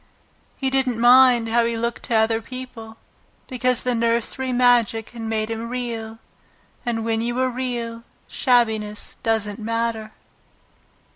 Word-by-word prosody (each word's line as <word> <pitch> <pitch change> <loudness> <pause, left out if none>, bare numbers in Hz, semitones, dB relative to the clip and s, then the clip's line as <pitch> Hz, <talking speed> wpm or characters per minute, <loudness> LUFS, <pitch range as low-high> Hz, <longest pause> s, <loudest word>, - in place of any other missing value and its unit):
He 265 -1 -1
didn't 260 -3 +1
mind 245 -1 +6
how 235 +1 +3
he 230 0 -1
looked 235 +1 -2
to 235 - -1
other 225 +1 +2
people, 230 -2 -9 0.5
because 255 -1 0
the 250 - 0
nursery 235 +3 0
magic 245 -3 +2
had 235 -1 -9
made 220 0 -2
him 225 +1 -4
Real, 230 -3 -4 0.7
and 225 -2 -2
when 225 0 0
you 240 +1 -2
are 260 0 +1
Real 240 -2 -4 0.2
shabbiness 220 -5 0
doesn't 220 -1 -1
matter. 225 -1 -2
230 Hz, 135 wpm, -22 LUFS, 225-245 Hz, 0.7 s, mind